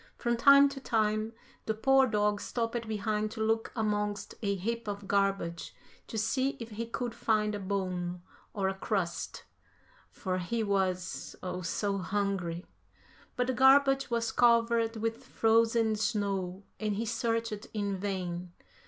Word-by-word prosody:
From 235 Hz, -1 st, 0 dB
time 280 Hz, +3 st, +7 dB
to 275 Hz, 0 st, -7 dB
time, 215 Hz, -3 st, 0 dB, 0.4 s
the 220 Hz, -, 0 dB
poor 270 Hz, +4 st, +4 dB
dog 210 Hz, -2 st, +1 dB
stopped 230 Hz, -1 st, -2 dB
behind 215 Hz, 0 st, -1 dB
to -, -, -8 dB
look 225 Hz, +1 st, 0 dB
amongst 210 Hz, -2 st, -1 dB
a 200 Hz, -2 st, 0 dB
heap 230 Hz, +4 st, -3 dB
of 200 Hz, -1 st, -5 dB
garbage 195 Hz, -4 st, 0 dB, 0.3 s
to 225 Hz, -, -5 dB
see 260 Hz, +6 st, 0 dB
if 230 Hz, -1 st, -7 dB
he 225 Hz, +2 st, -4 dB
could 235 Hz, 0 st, -3 dB
find 215 Hz, -2 st, +1 dB
a 205 Hz, -, -3 dB
bone 185 Hz, -3 st, -3 dB, 0.3 s
or 195 Hz, -2 st, -1 dB
a 190 Hz, -, 0 dB
crust, 190 Hz, -4 st, -3 dB, 0.7 s
for 185 Hz, -1 st, -3 dB
he 220 Hz, +6 st, -1 dB
was 190 Hz, -3 st, -1 dB
oh, 180 Hz, 0 st, -3 dB
so 195 Hz, +3 st, -1 dB
hungry, 190 Hz, -3 st, -2 dB, 0.7 s
but 250 Hz, -, +1 dB
the 260 Hz, -, 0 dB
garbage 270 Hz, +1 st, +5 dB
was 235 Hz, -1 st, 0 dB
covered 230 Hz, -1 st, +3 dB
with 225 Hz, +3 st, -2 dB
frozen 225 Hz, -2 st, +3 dB
snow 200 Hz, -4 st, -1 dB, 0.2 s
and 215 Hz, -2 st, -1 dB
he 225 Hz, +3 st, -2 dB
searched 230 Hz, -1 st, -2 dB
in 205 Hz, -2 st, -1 dB
vain. 180 Hz, -2 st, -3 dB
215 Hz, 145 wpm, -30 LUFS, 195-230 Hz, 0.7 s, time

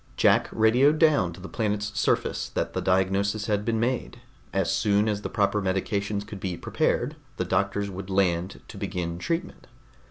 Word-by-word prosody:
Jack -, -, +4 dB
radioed 125 Hz, +7 st, +4 dB
down 150 Hz, -, +4 dB
to 85 Hz, -, -11 dB
the 95 Hz, -, -8 dB
planet's 105 Hz, -1 st, -1 dB
surface 105 Hz, -, 0 dB
that -, -, -2 dB
the -, -, -1 dB
diagnosis 95 Hz, +3 st, +1 dB
had 105 Hz, -1 st, 0 dB
been 115 Hz, 0 st, 0 dB
made; 120 Hz, 0 st, -1 dB, 0.3 s
as 95 Hz, -2 st, 0 dB
soon 105 Hz, 0 st, +2 dB
as 105 Hz, -1 st, -1 dB
the -, -, -4 dB
proper 105 Hz, 0 st, +1 dB
medications 100 Hz, +2 st, -1 dB
could 100 Hz, -1 st, -8 dB
be 90 Hz, -3 st, -3 dB
prepared, 140 Hz, -, 0 dB, 0.2 s
the 90 Hz, -, -1 dB
doctors 100 Hz, +3 st, 0 dB
would 95 Hz, +1 st, -7 dB
land 95 Hz, -1 st, 0 dB
to -, -, -10 dB
begin 85 Hz, -2 st, -3 dB
treatment. 170 Hz, -, -3 dB
100 Hz, 170 wpm, -26 LUFS, 95-110 Hz, 0.3 s, Jack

